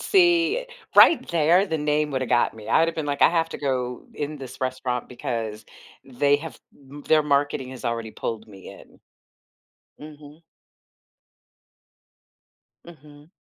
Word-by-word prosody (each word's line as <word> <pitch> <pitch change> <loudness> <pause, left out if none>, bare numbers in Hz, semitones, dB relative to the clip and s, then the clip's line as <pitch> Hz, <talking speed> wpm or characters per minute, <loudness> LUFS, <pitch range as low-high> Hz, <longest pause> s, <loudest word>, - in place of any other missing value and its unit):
See, 360 +5 +3 0.3
right 335 - +7
there, 170 +4 +3
the 160 - -2
name 150 0 0
woulda 130 -1 -1
got 120 - +1
me. 110 -1 -11
I - - +4
woulda 165 +1 +2
been 160 -1 -4
like, 145 0 -3
I - - +8
have 165 -1 0
to - - -6
go 125 -3 -3
in 150 0 -4
this 135 -2 -10
restaurant 130 -1 -3
because 115 -3 -5 0.4
they 140 +2 +1
have 160 +1 -9 0.3
m 145 +1 -10
their 155 -1 +4
marketing 140 -2 0
has 130 0 -11
already 115 -2 -3
pulled 110 0 -5
me 95 -2 -13
in. - - -16 1.0
Mhm. 150 +1 -13 2.4
Mhm. 150 -2 -16
145 Hz, 145 wpm, -24 LUFS, 125-160 Hz, 2.4 s, I